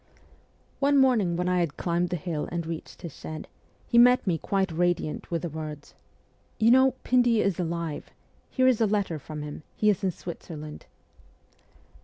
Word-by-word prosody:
One 280 0 +3
morning 225 -10 +3
when 180 0 -1
I 180 0 +2
had 170 -4 -1
climbed 175 0 0
the 180 - -1
hill 165 -2 -3
and 170 -1 -3
reached 165 -1 -7
his 165 -5 -7
shed, 155 0 -7 0.4
he 235 - +4
met 250 +1 +6
me 170 -5 0
quite 195 +1 0
radiant 175 -2 -1
with 170 -1 -2
the 170 - -2
words: 155 -1 -7 0.3
' - - -38
You 225 +1 +5
know, 260 +1 +5
Pindy 245 -3 +3
is 195 -3 0
alive! 170 -3 -3 0.4
Here 255 - +1
is 250 -3 +3
a 220 - +4
letter 195 -6 -1
from 150 +1 -7
him; 150 0 -7
he 210 0 +3
is 195 - -3
in 190 - +2
Switzerland.' 160 -3 -8
175 Hz, 180 wpm, -27 LUFS, 160-220 Hz, 0.4 s, met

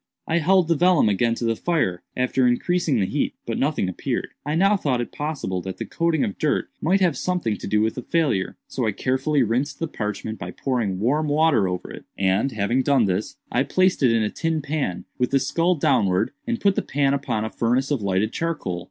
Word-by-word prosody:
"I 170 +1 +2
held 180 +2 +3
the 165 - +3
vellum 175 -7 +4
again 115 +3 +1
to 115 - -3
the 115 0 +1
fire, 110 - 0 0.2
after 125 0 +2
increasing 155 +2 +1
the 95 - +2
heat; - - -1
but - - -3
nothing 140 -8 0
appeared. 90 - -3
I 150 +2 -2
now 195 +5 +4
thought 140 -10 0
it 120 - -3
possible 145 - -3
that 95 +1 -6
the - - -4
coating 165 -3 0
of 100 - -3
dirt - - 0
might 190 +5 +2
have 175 -6 +3
something 180 -12 -1
to - - -7
do 105 +1 +2
with 110 0 +1
the 125 - -5
failure; 140 - 0
so 125 -4 -2
I 105 - 0
carefully 135 +5 +1
rinsed 130 +6 -1
the 165 - -2
parchment 110 -3 -4
by 90 - -5
pouring 115 -8 -1
warm 145 +8 +1
water 145 -8 +3
over 90 -1 -4
it, - - -10
and, 95 +7 +1
having 110 +4 0
done 135 -4 +3
this, 95 +2 -2
I 125 - +2
placed 185 +5 +2
it 125 -4 +5
in 115 -1 +2
a 105 - -1
tin 160 -2 -1
pan, 140 - -2
with 125 - +1
the 135 - +3
skull 170 +6 +1
downwards, 95 - +2 0.2
and 235 -1 -1
put 200 -1 +3
the - - 0
pan 140 0 +1
upon 130 -6 -1
a 110 - -5
furnace 125 +4 0
of 140 -6 0
lighted 100 +2 0
charcoal. 150 - -2
130 Hz, 220 wpm, -23 LUFS, 105-160 Hz, 0.2 s, it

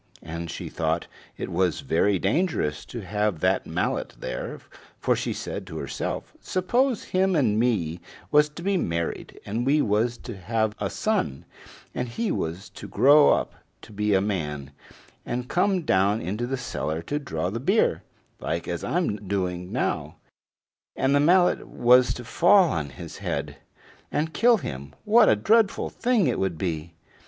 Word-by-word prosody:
And 85 +1 -6
she - - -6
thought 80 +1 -1 0.3
it - - -5
was 90 -1 +1
very 95 +4 +2
dangerous 100 - 0
to 120 - -7
have 105 -2 -1
that - - +1
mallet - - -2
there, - - -5 0.4
for - - +2
she - - -2
said - - -5
to - - -7
herself: - - -4
"Suppose 240 +7 0
him 190 0 +1
and 110 -8 +2
me 90 -9 0 0.3
was 150 0 +5
to 170 +3 -10
be 195 0 +1
married, 85 - -3
and 115 +4 -2
we 140 +4 +3
was 115 0 +1
to 120 - -8
have 110 +3 -1
a 100 - -1
son, 100 - -1 0.5
and 125 -1 -3
he 220 - -2
was 85 +5 -3
to 100 - -9
grow 145 +8 +6
up - - +1 0.3
to 110 - -13
be 105 0 +1
a 95 - +3
man, 75 -9 -3 0.5
and 125 +1 -4
come 185 +2 +1
down 100 -2 +2
into 105 +8 -3
the 135 +1 -2
cellar 85 -9 -3
to 145 - -2
draw 90 - -3
the 115 - -3
beer, 195 - +2 0.4
like - - -3
as - - -3
I'm 105 - -1
doing 90 -2 -2
now, - - -2 0.8
and 135 +1 +1
the 145 - +4
mallet 175 +4 +3
was 125 +1 +4
to 125 - -7
fall 175 - +5
on 75 -3 -2
his 65 - -9
head - - -4 0.5
and 160 +1 -1
kill 235 +8 +5
him, 70 - -7
what 220 +1 +6
a - - +5
dreadful 220 -1 +2
thing 240 -6 +1
it - - 0
would 95 -4 -1
be!" 85 -1 -4
110 Hz, 165 wpm, -25 LUFS, -, 0.8 s, grow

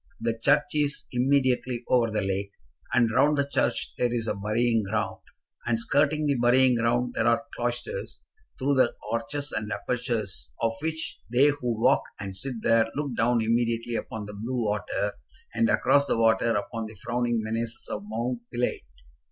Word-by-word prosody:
The 115 0 -1
church 145 +5 +2
is 150 -1 0
immediately 125 -1 +1
over 120 -2 +3
the 105 -2 -1
lake, 95 +1 -2 0.4
and 120 -3 +3
round 145 +6 +3
the 140 0 +1
church 120 -4 0
there 120 -1 +2
is 120 -2 -1
a - - +1
burying 110 +3 +1
ground, 105 +1 -2 0.5
and 115 -1 +1
skirting 145 +5 +2
the 145 - +3
burying 125 +1 +4
ground 120 +1 +1
there 110 - +1
are 115 +4 +2
cloisters, 120 - -4 0.3
through 140 +1 +1
the 130 - +3 0.2
arches 140 +6 -2
and 105 0 -3
apertures 115 -2 -2
of 115 -1 +1
which 160 0 -3
they 135 +4 +5
who 125 -6 -2
walk 130 +2 +5 0.2
and 95 -1 -5
sit 120 +2 -5
there 115 0 +4
look 140 -4 -2
down 115 0 +2
immediately 115 +1 0
upon 110 -2 -4
the 105 - -8
blue 120 +4 -2
water, 105 0 -1 0.4
and 230 -2 +2
across 140 -6 +3
the - - +1
water 115 0 +3
upon 110 +2 -3
the 110 - -11
frowning 120 +2 -1
menaces 115 +1 -4
of 105 - -3
Mount 115 +4 -3
Pilate. 120 0 -1
120 Hz, 170 wpm, -27 LUFS, 110-130 Hz, 0.5 s, they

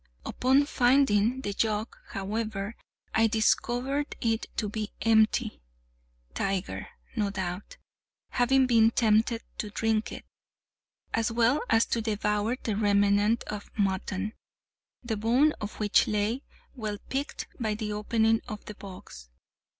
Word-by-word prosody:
Upon 265 +3 +3
finding 250 -3 +3
the 205 -5 -3
jug, 215 +1 -1
however, 210 +1 -3 0.4
I 225 0 +4
discovered 245 +5 0
it 225 -1 0
to 215 - 0
be 210 0 -4
empty—Tiger, - - -1 0.3
no 210 -3 +1
doubt, 190 - -5 0.5
having 260 +2 +3
been 225 -3 +5
tempted 225 0 +2 0.2
to 210 - -3
drink 220 +1 0
it, - - -8 0.9
as 230 +1 +1
well 240 +5 +3
as 225 0 +4
to 230 - -1
devour 210 +1 0
the 220 -4 -1
remnant 205 +1 +3
of 210 -1 -7
mutton, 195 +1 -1 0.7
the 225 -3 -2
bone 245 +8 +3
of 210 0 -6
which 210 -2 +3
lay, 210 +4 0 0.3
well 215 -4 -4
picked, 275 +2 -3
by 215 -3 -1
the 210 -1 -3
opening 225 +1 +2
of 210 -1 -7
the 210 - -7
box. 185 - -11
215 Hz, 125 wpm, -28 LUFS, 205-230 Hz, 0.9 s, been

